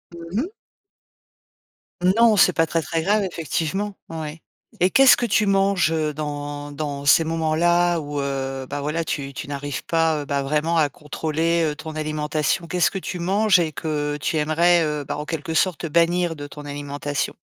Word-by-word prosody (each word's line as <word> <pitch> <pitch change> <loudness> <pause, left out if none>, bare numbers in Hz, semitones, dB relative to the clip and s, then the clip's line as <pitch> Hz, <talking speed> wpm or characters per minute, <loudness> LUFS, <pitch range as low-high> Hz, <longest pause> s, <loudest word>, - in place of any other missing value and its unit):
Mmh 170 +6 -3
mh. 335 - -4 1.7
Non, 230 -3 +5
c'est 185 -2 +5
pas 165 - +2
très, 165 +1 -1
très 160 +1 -2
grave 210 +2 +2
effectivement. 185 +3 -2
Ouais 160 -1 -6 0.4
et 180 +1 +3
qu'est-ce 270 -2 +7
que 245 - 0
tu 210 -2 +2
manges, 195 -3 +2
heu, 155 -2 0
dans 145 -1 -5
dans 145 -1 -4
ces 155 +3 +5
moments-là 170 +2 +2
où, 145 -1 -4
heu, 135 -1 -3
bah 145 0 -3
voilà 155 +3 -1
tu 140 -3 -4
tu - - -7
n'arrives 140 -4 -4
pas, 165 -2 +1
heu, - - -7
bah, 140 -1 -1
vraiment 150 +4 0
à 150 -3 +3
contrôler, 160 +3 -1
heu, - - -6
ton 155 +1 -8
alimentation? 155 +1 -1
Qu'est-ce 180 0 +2
que 195 - -3
tu 180 - -5
manges 195 +2 +3
et 160 -2 0
que 150 -1 -2
tu 155 +5 0
aimerais, 170 +3 +3
heu, 150 -1 -2
bah, - - -4
en 150 - -5
quelque 160 0 -4
sorte 170 -1 +1
bannir 170 +1 +2
de 145 -1 -7
ton 145 +1 -10
alimentation? 145 0 -3
160 Hz, 180 wpm, -22 LUFS, 145-175 Hz, 1.7 s, qu'est-ce